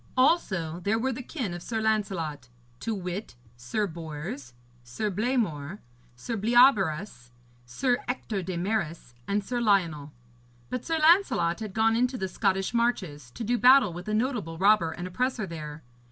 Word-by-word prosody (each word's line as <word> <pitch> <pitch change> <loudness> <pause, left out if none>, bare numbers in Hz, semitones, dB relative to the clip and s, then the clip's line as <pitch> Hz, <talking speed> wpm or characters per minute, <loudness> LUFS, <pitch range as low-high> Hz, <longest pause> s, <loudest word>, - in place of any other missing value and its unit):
Also 190 - +2
there 215 +4 +1
were 260 +4 0
the 255 - -6
kin 245 - -4
of 175 - -6
Sir 225 +3 -3
Lancelot, 185 - -1 0.3
to 225 - -2
wit, 185 - -5 0.2
Sir 125 - -2
Bors, 150 -7 -7 0.3
Sir 200 - -3
Blamore, 200 - -1 0.4
Sir 175 - -5
Bleobaris, 200 - +3 0.4
Sir 245 - 0
Ector 230 -5 -3
de 180 0 -4
Maris, 170 - -2
and 205 +1 0
Sir 245 +4 -2
Lionel. 170 -9 +1 0.6
But 250 -1 -3
Sir 325 -1 -1
Lancelot 310 - +4
had 215 -4 -6
gone 225 0 +3
into 250 +2 +1
the 190 - -2
Scottish 190 +2 0
marches, 185 - -1
to 175 - -7
do 240 +2 0
battle 250 -6 +6
with 175 +3 -8
a 215 - -1
notable 215 - -1
robber 195 -2 +4
and 175 +2 -6
oppressor 240 +3 -1
there. 155 -3 -8
200 Hz, 155 wpm, -27 LUFS, 165-235 Hz, 0.6 s, battle